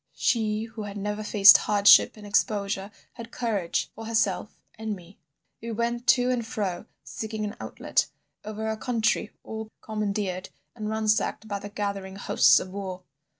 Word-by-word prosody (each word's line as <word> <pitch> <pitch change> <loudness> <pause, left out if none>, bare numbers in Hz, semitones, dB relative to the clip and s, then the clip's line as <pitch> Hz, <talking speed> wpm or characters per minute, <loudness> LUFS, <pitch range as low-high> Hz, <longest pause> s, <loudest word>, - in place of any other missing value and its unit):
She 215 -2 +1
who 225 -1 -8
had 205 -1 -6
never 210 +1 -3
faced 200 -2 +8
hardship 205 +1 +5
and 210 - -11
exposure 200 -1 0 0.2
had 230 -2 -9
courage 210 -9 -2
for 225 0 -8
herself 210 -3 -1
and 220 -1 -4
me. 180 +1 -16 0.4
We 230 - -6
went 235 +2 -2
to 250 0 +4
and 245 -2 -1
fro 210 -4 -4 0.2
seeking 220 -1 -5
an 205 - -5
outlet, - - -1 0.4
over 215 +1 -5
a 220 0 -2
country 225 -2 0
all 220 0 -6
commandeered 200 -3 -3 0.3
and 215 -2 -4
ransacked 220 0 0
by 200 -1 -3
the 205 - -8
gathering 200 -2 -4
hosts 150 -6 +4
of 185 - -7
war. 190 -2 -6
210 Hz, 155 wpm, -26 LUFS, 200-220 Hz, 0.4 s, faced